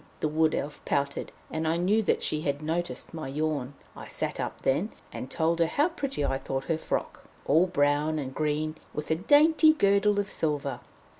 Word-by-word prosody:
the - - +1
Wood 155 +1 +2
Elf 145 +1 -4
pouted; 140 0 -1 0.2
and 160 0 -2
I 165 +1 +2
knew 195 +6 +2
that 215 - 0
she 155 - -1
had 145 0 -2
noticed 160 -4 -3
my 160 -4 -5
yawn. 145 -1 -2 0.2
I - - -9
sat - - -3
up - - -4
then, 155 +11 +1 0.2
and 130 - -6
told 165 +3 0
her 165 - +4
how 295 - +2
pretty 275 - -2
I 135 0 0
thought 135 0 -3
her 160 +3 -1
frock, - - -3 0.2
all 165 +6 +4
brown 150 -1 +1
and 135 -3 -4
green, 155 +1 -1 0.2
with 150 +1 -4
a - - +4
dainty 310 - +5
girdle 200 -5 +3
of 200 0 -2
silver. 140 -5 -1
155 Hz, 195 wpm, -28 LUFS, 145-185 Hz, 0.2 s, dainty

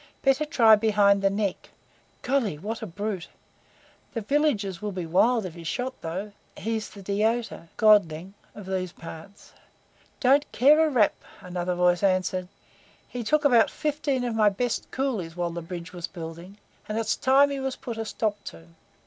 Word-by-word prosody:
Better 270 +2 +3
try 230 -8 +6
behind 205 -2 +3
the 195 - +3
neck. 200 -1 -2 0.5
Golly! 250 - 0
what 215 +8 -5
a 220 - -5
brute! 200 0 -4 0.9
The 230 - -1
villagers 215 - 0
will 210 -1 -3
be 185 -3 -4
wild 220 +7 +2
if 180 - -6
he's 170 -1 -9
shot, 255 +8 -2
though. 185 +6 -5 0.3
He's 220 -1 -3
the 200 - -12
deota 215 -1 -1
[godling] 195 -4 +3 0.2
of 205 - -9
these 185 -2 -3
parts." 165 +4 -12 0.7
"Don't 280 +1 +3
care 300 +5 +5
a - - 0
rap," 235 -8 +3 0.3
another 180 0 -3
voice 175 0 +2
answered; 185 -1 +1 0.6
"he 245 -1 -5
took 300 +6 +1
about 240 -5 +5
fifteen 295 -4 -1
of 240 -2 -2
my 215 -2 +4
best 230 +4 -2
coolies 225 -12 -2
while 175 -1 -2
the 170 +1 -5
bridge 170 +1 -8
was 175 -1 -5
building, 170 +3 -9 0.3
and 215 - -2
it's 225 -1 0
time 275 +2 +4
he 280 - -3
was 265 -1 -3
put 230 -2 -7
a 225 - -2
stop 210 -1 -2
to. 80 0 -10
210 Hz, 170 wpm, -26 LUFS, 180-245 Hz, 0.9 s, try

